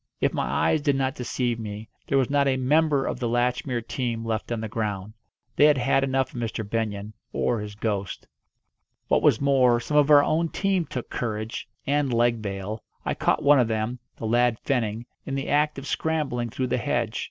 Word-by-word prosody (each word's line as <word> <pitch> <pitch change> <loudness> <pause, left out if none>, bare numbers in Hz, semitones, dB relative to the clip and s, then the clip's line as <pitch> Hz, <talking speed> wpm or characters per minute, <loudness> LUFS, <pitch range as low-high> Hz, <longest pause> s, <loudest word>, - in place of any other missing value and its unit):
If - - +1
my - - -1
eyes 155 - +2
did 145 -2 +2
not 135 -1 0
deceive 120 -1 -2
me, 105 0 -6 0.2
there 140 - +2
was 130 -2 +3
not 140 -1 +3
a 130 -1 +2
member 145 +1 +2
of - - -3
the 120 - -1
Latchmere 120 0 0
team 115 -3 -2
left 110 0 -3
on 115 - -1
the 110 - -3
ground. 105 -2 -3 0.4
They 145 - +6
had 150 -2 +5
had 135 +2 +2
enough 135 -1 0
of 120 - -5
Mr. 115 -2 -3
Benyon 105 -1 -3 0.2
or 120 -2 0
his 105 -1 -6
ghost. 100 -4 -3 0.8
What - - +3
was - - +4
more, 130 -4 +4
some 150 +5 -1
of 145 0 +5
our 145 -1 +8
own 165 +2 +1
team 190 -3 0
took 125 - -6
courage, 110 -1 -3 0.2
and 145 -1 +1
leg 120 -1 +2
bail. 100 +1 -5 0.2
I - - 0
caught - - 0
one 145 -1 +6
of 120 - +3
them 110 +2 -2 0.2
the - - -5
lad 120 +1 +2
Fenning 115 -4 -1 0.2
in 135 - -2
the 135 - -3
act 150 +1 +2
of 135 - -6
scrambling 140 -7 -1
through 130 +4 -2
the 125 - 0
hedge. 115 -1 -1
120 Hz, 205 wpm, -25 LUFS, 110-140 Hz, 0.8 s, our